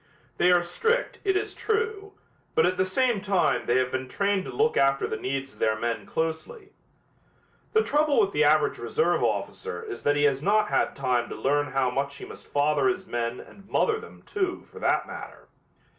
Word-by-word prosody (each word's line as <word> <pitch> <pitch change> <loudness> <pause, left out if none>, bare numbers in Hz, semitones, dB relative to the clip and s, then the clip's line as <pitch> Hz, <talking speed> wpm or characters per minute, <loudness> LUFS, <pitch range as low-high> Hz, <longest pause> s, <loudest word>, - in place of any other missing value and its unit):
They 180 - +5
are 175 -1 +4
strict, 455 - -1
it 385 -1 +2
is 400 - -3
true, 435 -2 -2 0.4
but - - +4
at 180 +1 +1
the 185 +1 +1
same 235 +2 +1
time 195 -3 +1
they 120 - +3
have 130 0 +1
been 130 0 -3
trained 200 +5 0
to - - -6
look 450 +2 +1
after 135 0 +3
the - - -3
needs 135 +1 -4
of - - -21
their 110 0 +1
men 115 +1 -3
closely. 165 - -4 1.0
The 440 0 +4
trouble 300 -3 +2
with 405 -3 +3
the - - +2
average - - +3
reserve 465 - +1
officer 455 0 -2
is 415 -3 -7
that 145 - +2
he 145 - +1
has 140 -2 +2
not 210 +4 +2
had - - +1
time 125 -3 0
to - - -6
learn 145 +2 +1
how 130 -2 +1
much 140 +2 -2
he - - -9
must - - -12
father 145 -1 +2
his 125 - -1
men 120 0 -3
and 195 0 -15
mother 440 -1 +2
them, 455 - -13
too, 380 -3 -3
for - - -11
that - - +1
matter. - - -10
180 Hz, 205 wpm, -26 LUFS, -, 1.0 s, They